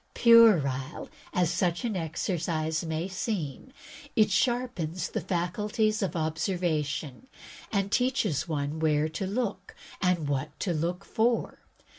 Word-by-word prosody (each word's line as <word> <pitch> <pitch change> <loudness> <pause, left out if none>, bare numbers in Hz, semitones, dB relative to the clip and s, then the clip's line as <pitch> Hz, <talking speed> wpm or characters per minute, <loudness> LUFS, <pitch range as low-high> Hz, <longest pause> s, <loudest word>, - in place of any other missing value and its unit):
Puerile 170 - +5 0.2
as 180 -2 +1
such 175 +5 0
an 225 -4 -1
exercise 160 -1 -1
may 160 +1 -2
seem, 185 - -4 0.4
it 215 -3 +4
sharpens 190 -5 0
the 220 - -3
faculties 210 +6 0
of 195 - -1
observation 160 - -2 0.4
and 200 -1 0
teaches 245 - +1
one 150 -1 -2
where 155 -1 +2
to 160 +5 -4
look 200 -3 -3 0.3
and 180 -5 +1
what 145 +2 -3
to 180 - 0
look 175 +4 -2
for. 230 +1 0
175 Hz, 120 wpm, -28 LUFS, 155-210 Hz, 0.4 s, Puerile